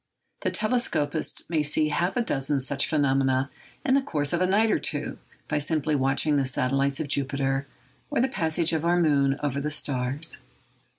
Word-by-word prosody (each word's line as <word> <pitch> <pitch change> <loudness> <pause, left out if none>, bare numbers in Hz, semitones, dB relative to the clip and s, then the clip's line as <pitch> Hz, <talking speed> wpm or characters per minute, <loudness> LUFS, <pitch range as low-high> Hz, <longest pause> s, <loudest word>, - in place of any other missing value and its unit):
The - - 0
telescopist 170 -10 -1
may 160 -2 +1
see 150 +1 +1
half 175 +7 0
a 240 - +2
dozen 140 -6 0
such 135 +1 0
phenomena 135 -2 +1 0.3
in 260 - +3
the 275 - +4
course 145 - -1
of 170 - +1
a 185 - +3
night 215 +4 +3
or - - +2
two, - - -2 0.3
by 150 - 0
simply 155 0 +1
watching 140 +2 +2
the 135 - +1
satellites 135 +2 0
of 155 - -2
Jupiter, 135 0 -1 0.4
or 290 - 0
the 260 - +3
passage 165 -7 +1
of 160 -1 0
our 175 +1 +3
moon 140 -4 +2
over 140 -1 -1
the 150 - -2
stars. 140 0 -2
145 Hz, 180 wpm, -26 LUFS, 135-165 Hz, 0.4 s, the